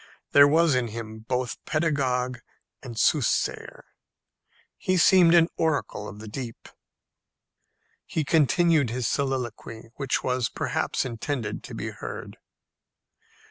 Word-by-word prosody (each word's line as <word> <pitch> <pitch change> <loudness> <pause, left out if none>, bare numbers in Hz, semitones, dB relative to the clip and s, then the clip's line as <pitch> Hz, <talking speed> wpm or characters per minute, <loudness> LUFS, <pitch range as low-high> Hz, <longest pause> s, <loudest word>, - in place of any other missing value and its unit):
There 140 0 +8
was 160 +1 +4
in 125 -2 +1
him 110 0 -7
both 125 +2 -3
pedagogue 130 -6 0 0.4
and 120 -4 -9
soothsayer. 140 +1 0 0.9
He 185 0 0
seemed 175 -1 +6
an 165 -1 +6
oracle 145 -9 -1
of 105 - -9
the 110 +1 -10
deep. 115 +1 -7 1.4
He 160 - -1
continued 155 -1 +3
his 120 0 -2
soliloquy, 120 -4 -3
which 135 -2 -1
was 125 -2 0
perhaps - - -2
intended 120 -2 -4
to - - -8
be - - -4
heard. - - -8
130 Hz, 115 wpm, -26 LUFS, 115-155 Hz, 1.4 s, There